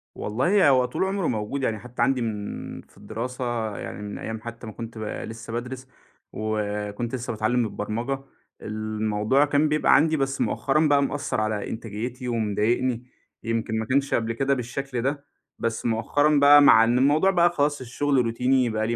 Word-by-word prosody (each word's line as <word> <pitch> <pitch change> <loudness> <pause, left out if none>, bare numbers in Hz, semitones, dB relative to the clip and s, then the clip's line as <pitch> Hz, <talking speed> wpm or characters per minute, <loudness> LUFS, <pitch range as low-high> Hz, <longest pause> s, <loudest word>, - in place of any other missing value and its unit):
والله 145 - +2
هو 130 -2 +4
طول 125 - -2
عمره 190 -2 -1
موجود 115 +4 -2
يعني 110 -4 -1
حتّى 120 - -7
عندي 135 -2 +2
من 105 -3 -5
في - - -25
الدراسة 115 0 -4
يعني - - -7
من 105 0 -6
أيّام 110 -1 -5
حتّى 115 0 -8
ما 110 - -7
كنت 115 0 -8
ب - - -6
لسّه 115 +1 -6
بادرِس، 125 +2 -5 0.5
وكنت 105 +2 -3
لسّه 125 -1 -4
باتعلم 115 +3 +1
البرمجة، 115 +6 -3 0.4
الموضوع 110 +4 0
كان 145 +1 +2
بيبقى 150 0 +4
عندي 160 +1 +3
بس 135 -1 -1
مؤخرًا 150 +3 +1
بقى 145 -1 +4
مأثر 140 -4 -2
على 110 -1 -2
إنتاجيتي 115 +3 -5
ومضايقني. 120 +2 0 0.4
يمكن 115 -1 -1
ما 110 - -2
كانش 140 +4 +1
قبل 115 0 0
كده 135 +4 +1
بالشكل 125 0 -3
ده، 140 +3 -2 0.3
بس 115 -1 -2
مؤخرًا 145 +6 +2
بقى 145 +1 +8
مع 115 -5 +7
إن 120 +2 +2
الموضوع 150 +8 +4
بقى 175 -1 +4
خلاص 145 -4 0
الشغل 140 +3 -1
روتيني 125 +2 +2
بقى 110 0 -1
لي 120 - 0
120 Hz, 170 wpm, -25 LUFS, 110-140 Hz, 0.5 s, بقى